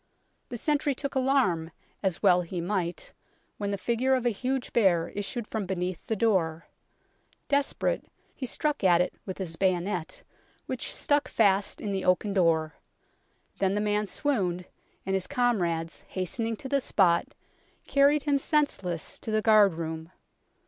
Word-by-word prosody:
The 240 - -5
sentry 290 +2 +1
took 280 +1 -4
alarm, 255 - +1 0.3
as 190 -4 -1
well 180 0 +5
he 175 +1 -5
might, 180 -1 -2 0.5
when 205 -1 -2
the 200 - -1
figure 240 +6 +1
of 250 -1 -2
a 240 - +3
huge 255 +4 -3
bear 185 -8 +3
issued 210 +3 -4
from 215 -3 -4
beneath 180 -2 -3
the 220 - 0
door. 175 -7 +1 0.8
Desperate, 285 - +1 0.3
he 260 - -5
struck 300 0 -1
at 175 -2 +5
it 180 - 0
with 190 - -5
his 165 -4 -3
bayonet, 180 -2 -1 0.4
which - - -4
stuck 290 0 +1
fast 200 -2 +2
in 205 - -3
the 190 -1 -2
oaken 185 +3 +2
door; 165 -5 +1 0.8
then 195 0 +1
the - - +1
man 210 0 0
swooned, 185 -9 -1 0.4
and 195 - -1
his 190 -1 0
comrades, 175 -10 0
hastening 225 +5 -2
to 265 - -8
the 280 0 +1
spot, 175 -8 +2 0.5
carried 280 +1 +4
him 285 -2 +2
senseless 195 - 0
to - - -6
the 215 0 +1
guard 210 -5 +5
room. 160 0 -5
200 Hz, 155 wpm, -28 LUFS, 180-245 Hz, 0.8 s, well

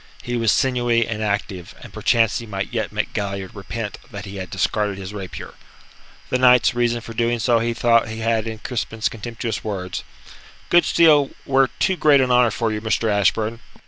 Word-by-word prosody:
He 120 - -3
was 115 -2 +2
sinewy 120 -3 +1
and 110 -1 -4
active, 100 -4 -3
and - - -12
perchance 115 +2 +2
he 115 - -9
might 100 -2 -4
yet - - -2
make - - -3
Galliard 100 -2 -4
repent 105 +1 -6
that 100 -1 -8
he 100 0 -8
had 95 -1 -6
discarded 105 -2 -1
his 95 +1 -7
rapier. 95 -3 -7 0.8
The 125 - +1
knight's 125 -1 +5
reason 120 -1 0
for 115 - -9
doing 120 +1 0
so 115 0 +2
he 115 +1 -1
thought 115 -1 +3
he 110 0 -6
had 115 0 0
in 110 0 -5
Crispin's 110 -1 -3
contemptuous 115 0 -5
words: 95 -7 -4 0.7
"Good 175 0 +5
steel 150 -4 +5 0.2
were 135 0 +3
too 190 - +1
great 145 -4 +5
an 130 -1 +2
honour 125 -1 +5
for 115 +1 -1
you, 105 0 -3
Mr. 110 0 0
Ashburn." 110 +3 +1
115 Hz, 190 wpm, -21 LUFS, 105-120 Hz, 0.8 s, knight's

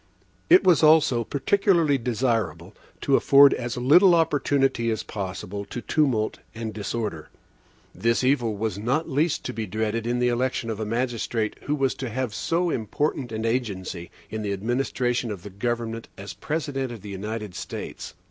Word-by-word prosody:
It 185 - +7
was 180 -5 +5
also 155 -6 +5
peculiarly 160 - +2
desirable 115 -7 -1 0.3
to - - +3
afford 140 0 +7
as 120 +1 -4
little 170 +9 +6
opportunity 140 -6 +1
as 110 -2 -1
possible 100 0 -5
to 120 - -6
tumult 120 -6 0 0.2
and 110 -1 -5
disorder. 105 -6 -4 0.6
This 115 +2 +1
evil 125 -5 +1
was 105 -2 -2
not 135 +9 0
least 150 +4 0
to 125 - -3
be 110 -2 -4
dreaded 110 +3 -2
in 120 +1 0
the 125 0 +2
election 120 -1 -1
of 110 - -5
a 110 - -2
magistrate, 115 -1 -1
who 145 - 0
was 135 -2 +1
to 130 - -5
have 125 -1 -3
so 170 +8 0
important 125 +2 -2
an 110 0 -3
agency 100 -7 -3 0.2
in 110 - -3
the 100 -1 -2
administration 120 +3 -1
of 100 -4 -6
the 105 - -9
government 115 +2 -3
as 100 +1 -7
the - - -27
President 145 -4 -2
of 115 -4 -8
the 105 - -9
United 105 +1 -5
States. - - -7
120 Hz, 165 wpm, -25 LUFS, 110-135 Hz, 0.6 s, It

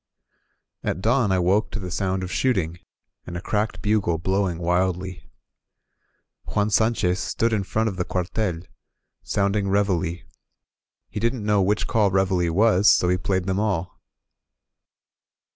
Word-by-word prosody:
AT - - -2
dawn 115 +1 +2
I 95 - +3
woke 100 +4 +2
to 105 - -5
the 90 -2 -6
sound 95 0 -1
of 90 - -5
shooting, 90 -10 0 0.5
and 85 - -5
a - - -3
cracked 105 +4 -2
bugle 105 -6 +1
blowing 95 0 0
wildly. 90 +1 -1 1.2
Juan 105 0 0
Sanchez 105 -4 +2
stood 115 +3 0
in 105 - +1
front 110 +4 -1
of 95 -4 -3
the 90 - 0
cuartel, 90 0 -2 0.6
sounding 100 0 0
Reveille; 95 -4 0 0.8
he 105 - -5
didn't 115 0 -1
know 105 -1 +3
which 100 +3 +1
call 105 -3 +2
Reveille 95 -3 +1
was, 105 +2 +4
so 90 - +4
he 90 - +3
played 95 0 -1
them 95 +1 0
all. 95 -5 -2
95 Hz, 145 wpm, -23 LUFS, 90-105 Hz, 1.2 s, was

